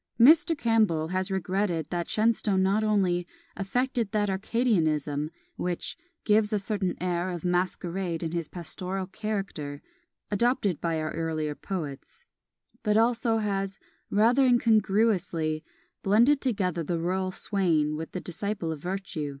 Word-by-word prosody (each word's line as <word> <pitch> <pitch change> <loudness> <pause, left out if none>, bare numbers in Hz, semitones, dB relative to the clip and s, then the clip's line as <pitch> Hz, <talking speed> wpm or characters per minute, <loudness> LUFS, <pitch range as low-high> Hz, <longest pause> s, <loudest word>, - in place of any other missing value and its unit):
Mr. 315 +5 +6
Campbell 215 - +2
has 185 +1 0
regretted 190 -4 -1
that 175 -1 -2
Shenstone 215 -3 +2
not 200 +3 +2
only 185 -5 +1 0.3
"affected 235 +2 -1
that 205 -1 +1
arcadianism" 160 - 0 0.3
which 175 -1 -3 0.3
"gives 210 0 +3
a 210 - +2
certain 200 -2 -1
air 180 0 -1
of 175 -1 -5
masquerade 180 -1 -1
in 165 - -2
his 170 -2 -2
pastoral 185 +3 -4
character," 195 -8 -4 0.5
adopted 205 - +1
by 165 -2 0
our 155 0 -2
earlier 160 -2 -2
poets, 170 - -6 0.6
but 210 -2 +2
also 230 0 +2
has 195 -2 -2 0.3
"rather 235 +6 +4
incongruously 205 -9 +2 0.4
blended 235 +8 +4
together 190 - 0
the 170 +2 -1
rural 185 +3 -1
swain 165 -7 +1
with 160 +1 -5
the 185 - -2
disciple 180 -1 -3
of 155 -3 -6
virtù." 180 -5 -3
190 Hz, 130 wpm, -27 LUFS, 170-215 Hz, 0.6 s, Mr